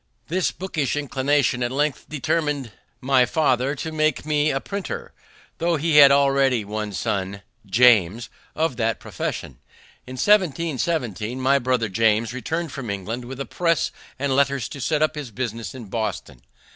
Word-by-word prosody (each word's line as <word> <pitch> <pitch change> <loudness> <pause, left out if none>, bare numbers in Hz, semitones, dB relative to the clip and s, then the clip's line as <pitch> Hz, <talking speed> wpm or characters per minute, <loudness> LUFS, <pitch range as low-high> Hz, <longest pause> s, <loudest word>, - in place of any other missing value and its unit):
This 180 +2 +1
bookish 160 -8 -2
inclination 140 -2 +1
at 120 0 0
length 145 +1 -1
determined 145 -3 -1 0.3
my 130 -1 +4
father 135 -1 +1
to 160 +3 -5
make 155 -3 0
me 150 0 +2
a 135 - 0
printer, 200 +6 -6 0.5
though 170 0 +1
he 155 0 +2
had 140 -2 +10
already 135 -4 +3
one 105 0 -4
son 100 0 -3 0.2
(James) 115 0 +4 0.3
of 155 -5 0
that 115 -2 0
profession. - - -5 0.5
In 130 - -7
1717 150 - 0
my 135 +2 +3
brother 125 -2 0
James 110 +3 +1
returned 160 +6 -3
from 125 -5 -6
England 105 +5 -4
with 130 +2 -8
a 140 - -3
press 170 -4 0 0.3
and 135 0 0
letters 140 -3 +1
to 140 - -8
set 155 +5 +1
up 155 - +1
his 150 -5 -6
business 115 -1 -5
in 125 -3 -8
Boston. 100 - -4
130 Hz, 155 wpm, -23 LUFS, 115-150 Hz, 0.5 s, had